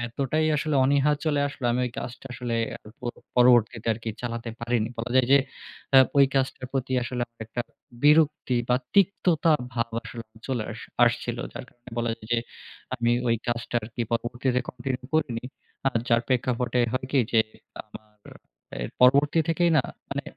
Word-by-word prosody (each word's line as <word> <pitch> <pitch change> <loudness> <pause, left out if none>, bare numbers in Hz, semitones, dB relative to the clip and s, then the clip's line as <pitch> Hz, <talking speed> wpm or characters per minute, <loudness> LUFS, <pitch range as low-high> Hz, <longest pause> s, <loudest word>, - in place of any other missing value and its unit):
এতটাই 140 +6 0
আসলে 150 0 -1
অনীহা 140 +2 +3
চলে 145 -2 +1
আসলো, 140 - -9
আমি 125 - 0
ঐ - - -2
কাজটা 125 +2 -7
আসলে 120 -1 -3 0.5
পর 120 - -3 0.2
পরবর্তীতে 120 -2 +4
আরকি 115 +1 -6
চালাতে 115 0 -4
পারিনি। 120 -2 0
বলা 115 +2 -4
যায় 130 - +4
যে, 140 - +8 0.6
আ - - +11 0.2
ঐ - - +7
কাজটার 130 -1 0
প্রতি 130 -1 -2
আসলে 125 0 -4
আমার 115 -1 -45
একটা 120 +2 -4 0.4
বিরক্তি 150 -4 +4
বা 125 - +4 0.2
তিক্ততা 180 -4 +3 0.2
ভাব 115 0 -1 0.2
আসলে 115 -1 -8 0.2
চলে 125 -5 -1
আস 115 - -9 0.2
আসছিল। 120 0 -1 0.2
যার - - -7
কারণে 120 0 -17
বলা 120 -1 0
যায় 110 - -14
যে, 120 - +3 0.6
আমি 120 -1 +1 0.2
ওই 115 - +3
কাজটা 120 0 -3
আরকি 120 +2 -4
পরবর্তীতে 120 +2 0
continue 125 0 -4
করিনি। 130 -8 0 0.4
আ - - +7 0.2
যার 115 0 +4
প্রেক্ষাপটে 125 -1 0
হয় 130 0 -2
কি 140 - +4
যে, 115 - +6 0.4
আমার 105 -1 -15 0.5
এর - - -5
পরবর্তী 140 +5 +5
থেকেই 170 +1 +2
না - - +3 0.3
মানে, - - -2
125 Hz, 165 wpm, -26 LUFS, 115-135 Hz, 0.6 s, আ